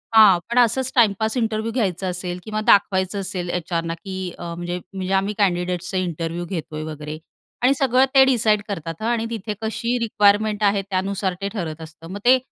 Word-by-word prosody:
हां, 210 -5 +8
पण 245 +1 +3
असंच 250 +2 +2
टाईमपास 220 -1 +3
इंटरव्ह्यू 225 -1 -1
घ्यायचा 190 -6 -1
असेल 180 0 -4
किंवा 215 -1 -3
दाखवायचं 190 -1 +3
असेल 185 -2 -4
एच्आरना 165 -1 -2
की 190 +3 -9 0.3
अ, - - -7
म्हणजे 175 +1 -4
म्हणजे 190 0 -3
आम्ही 195 +2 +1
कँडिडेट्सचा 180 -1 0
इंटरव्ह्यू 170 -1 -3
घेतोय 160 -3 -5
वगैरे 155 0 -6 0.5
आणि 260 +2 +5
सगळं 260 0 +4
ते 270 - +9
डिसाईड 220 -5 +3
करतात 165 -3 -5
हं 220 - -1
आणि 235 -1 0
तिथे 220 -2 -4
कशी 230 +2 -1
रिक्वायरमेंट 210 0 +2
आहे 200 -1 +3
त्यानुसार 190 0 -1
ते 200 - -1
ठरत 165 -6 -4
असतं. 160 +1 -11
मग 200 - -5
ते 255 +1 +7
195 Hz, 175 wpm, -22 LUFS, 175-220 Hz, 0.5 s, ते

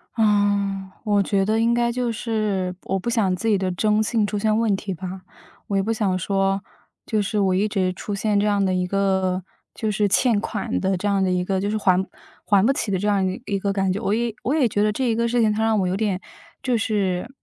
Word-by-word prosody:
啊， 205 -3 +1
我 205 -2 +3
觉 195 -1 +1
得 215 +2 +1
应 230 +1 +3
该 240 0 +2
就 245 0 -1
是 215 -5 -2
我 195 - -1
不 205 - -3
想 220 -6 +1
自 190 +5 -4
己 210 -2 +4
的 190 -1 -1
征 210 +4 +2
信 215 -1 +1
出 210 - -3
现 215 +1 +1
问 225 -3 +2
题 195 0 -4
吧。 185 +1 -7 0.5
我 200 - 0
也 195 - +3
不 225 +3 -1
想 195 -4 0
说， 195 +1 0 0.4
就 215 -2 0
是 205 +1 -1
我 190 -2 +2
一 195 +3 +2
直 190 -3 0
出 205 - -6
现 205 +1 0
这 205 - +2
样 205 -1 +2
的 190 -1 +1
一 180 0 0
个， 190 -1 0 0.3
就 220 - -2
是 205 0 +1
欠 230 +2 +3
款 210 -2 -3
的 190 -1 +1
这 205 - -2
样 200 -1 +2
的 185 - +1
一 180 0 0
个 190 0 0
就 200 - -1
是 215 - 0
还 190 -2 +2 0.4
还 200 -1 +3
不 270 - +4
起 225 -6 -2
的 190 - 0
这 205 - -1
样 200 -2 +2
一 185 +6 -3
一 200 - -1
个 200 +1 -1
感 195 -1 0
觉。 205 - -4
我 205 - 0
也 235 0 0
我 265 - 0
也 295 -5 +3
觉 205 -1 0
得 210 - +2
这 255 +5 -2
一 225 - +1
个 235 +1 0
事 240 +1 +1
情 215 -2 +3
它 220 +1 -1
让 220 -1 +2
我 185 - +1
有 180 - 0
点， 200 -3 -1 0.4
就 255 -2 0
是 200 -2 -1
205 Hz, 275 characters per minute, -23 LUFS, 190-220 Hz, 0.5 s, 己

